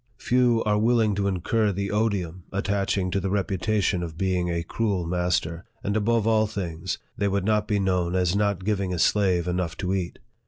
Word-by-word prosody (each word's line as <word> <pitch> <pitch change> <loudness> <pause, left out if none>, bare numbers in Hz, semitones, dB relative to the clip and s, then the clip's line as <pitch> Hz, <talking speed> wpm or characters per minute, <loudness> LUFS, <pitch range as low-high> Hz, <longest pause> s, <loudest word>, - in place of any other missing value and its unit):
Few 120 -2 +2
are 105 -1 +2
willing 115 -1 +3
to 100 0 0
incur 100 +3 +1
the 100 +1 -3
odium 100 -5 -1
attaching 100 -1 0
to 100 - +1
the 95 0 -2
reputation 100 0 0
of 80 -2 -6
being 90 -1 0
a 85 -1 -1
cruel 100 -1 -1
master; 90 -1 -1 0.2
and 100 +1 -1
above 110 +1 +2
all 110 -1 +3
things, 85 -6 -4 0.2
they 100 - +2
would 100 -1 0
not 105 0 +1
be 105 - +1
known 90 -2 0
as 90 0 +1
not 100 -2 0
giving 100 -3 0
a - - -4
slave 90 -1 +2
enough 90 -2 -2
to 95 -1 -1
eat. 90 -3 -3
95 Hz, 190 wpm, -25 LUFS, 90-105 Hz, 0.2 s, willing